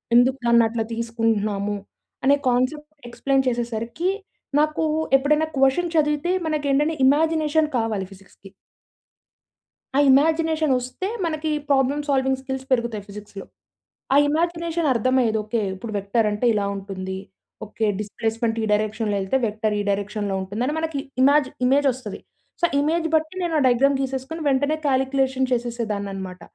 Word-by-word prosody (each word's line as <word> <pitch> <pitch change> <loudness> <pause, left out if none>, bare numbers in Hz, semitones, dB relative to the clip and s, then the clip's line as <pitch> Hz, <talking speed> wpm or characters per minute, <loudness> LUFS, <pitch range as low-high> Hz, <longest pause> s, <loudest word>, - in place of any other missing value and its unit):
ఎందుకు 255 +2 +5
దాన్ని 235 -1 +5
అట్లా 225 0 -2
తీసుకుంటున్నాము?" 215 -3 -1 0.5
అనే 280 +1 +6
కాన్సెప్ట్ 265 +5 0 0.2
ఎక్స్‌ప్లెయిన్ 270 +2 0
చేసేసరికి 235 +7 -2 0.5
నాకు 305 +1 +1 0.3
ఎప్పుడైనా 300 +3 +3
క్వషన్ 270 +6 +2
చదివితే 300 +2 +1 0.2
మనకు 305 -2 -1
ఏంటంటే 295 +4 +2
ఇమాజినేషన్ 310 +2 +3
కావాలి 220 -4 -1
ఫిజిక్స్‌కి 195 +1 -16 1.5
ఆ - - +5
ఇమాజినేషనొస్తే 310 0 +1 0.2
మనకి 315 -1 -2 0.2
ప్రాబ్లమ్ 275 +1 +2
సాల్వింగ్ 265 -1 +1
స్కిల్స్ 265 0 -5
పెరుగుతాయి 235 -4 0
ఫిజిక్స్‌లో. 200 -1 -9 0.7
ఆ - - +4
ఇమాజినేషన్ 335 +1 0
అర్థమయ్యేది. 245 -1 +2
ఓకె. 220 +2 -1
ఇప్పుడు 220 +3 -7
వెక్టర్ 200 +3 +1
అంటే 210 +4 -1
ఇలా 205 -2 0
ఉంటుంది 190 -1 -5 0.5
ఓకే 220 +1 -3
డిస్‌ప్లేస్‌మెంట్ 225 +2 -2
ఈ - - +1
డైరెక్షన్‌లో 215 0 0
వెళ్తే 190 +7 0
వెక్టర్ 215 0 -1
ఈ - - +1
డైరెక్షన్‌లో 200 0 -2
ఉంటుందని 220 +9 -2
మనకి 320 -3 -2 0.2
ఇమాజ్ 285 +1 +5 0.2
ఇమేజ్ 275 +3 +3
వస్తది. 245 -5 -7 0.4
సో, - - +5
ఇమేజ్ 325 +3 +1
బట్టి 315 +2 0
నేను 345 -2 -1
ఆ - - +1
డయాగ్రామ్ 265 +3 +3
గీసేసుకొని 270 +4 -4
వెంటనే 285 +3 +1
కాలిక్యులేషన్ 265 -1 +1
చేసేసేదానన్నమాట. 205 -6 -3
255 Hz, 130 wpm, -23 LUFS, 215-295 Hz, 1.5 s, అనే